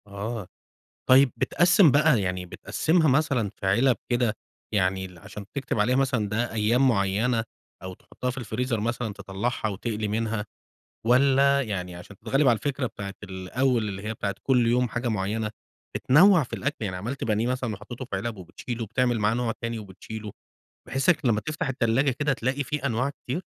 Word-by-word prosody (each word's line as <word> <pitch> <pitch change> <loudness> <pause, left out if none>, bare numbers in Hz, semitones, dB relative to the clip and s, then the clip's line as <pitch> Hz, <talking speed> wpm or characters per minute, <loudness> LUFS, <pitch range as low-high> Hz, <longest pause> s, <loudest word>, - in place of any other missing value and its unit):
آه، 100 +1 -5 0.6
طيب 130 0 +7
بتقَسّم 175 0 +5
بقى، 145 -5 +4
يعني 90 -1 -2
بتقَسّمها 160 - +1
مثلًا 135 -6 +2
في - - -7
علب 120 +6 +4
كده، 120 -3 +2 0.4
يعني 95 -1 +1
ال 90 -2 -12
عشان 100 +4 -9
تكتب 130 -5 -2
عليها 120 +5 +3
مثلًا 130 -6 +1
ده 110 +3 -1
أيام 115 +5 +3
معينة 110 +2 +1 0.4
أو 95 0 -6
تحطها 125 +6 -6
في 125 - -5
الفريزر 120 0 -2
مثلًا 115 0 -2
تطلعها 100 +4 -3
وتقلي 105 +1 -3
منها، 110 0 -1 0.6
والّا 140 +3 +4
يعني 90 -6 -4
عشان 90 +3 -11
تتغلب 135 +6 +2
على 120 - +5
الفكرة 135 +2 -2
بتاعة 100 -4 -7
الأول 105 +5 -1
اللي 95 -1 -6
هي 110 +1 -3
بتاعة 100 -2 -3
كل 125 -3 +3
يوم 125 +1 +2
حاجة 120 +1 -2
معينة، 105 +1 -1 0.5
بتنوع 175 +6 +6
في 125 - -9
الأكل 140 +3 -2
يعني 95 -3 -3
عملت 115 +9 -4
بانيه 110 +1 +1
مثلًا 125 -3 -1
وحطيته 120 +5 -8
في 110 - -4
علب 110 +3 -3
وبتشيله 115 +6 -6
وبتعمل 120 +2 0
معاه 105 +1 +2
نوع 120 -1 0
تاني 115 -1 -2
وبتشيله؟ 105 +1 -8 0.6
بحيث 135 +4 -1
يك 175 -6 +3
لما 110 -3 +3
تفتح 155 +5 -3
التلاجة 130 +1 +2
كده 145 +3 0
تلاقي 135 +2 -1
في 140 +1 -2
أنواع 125 +2 0
كتير؟ 140 +4 -5
115 Hz, 175 wpm, -26 LUFS, 105-130 Hz, 0.6 s, طيب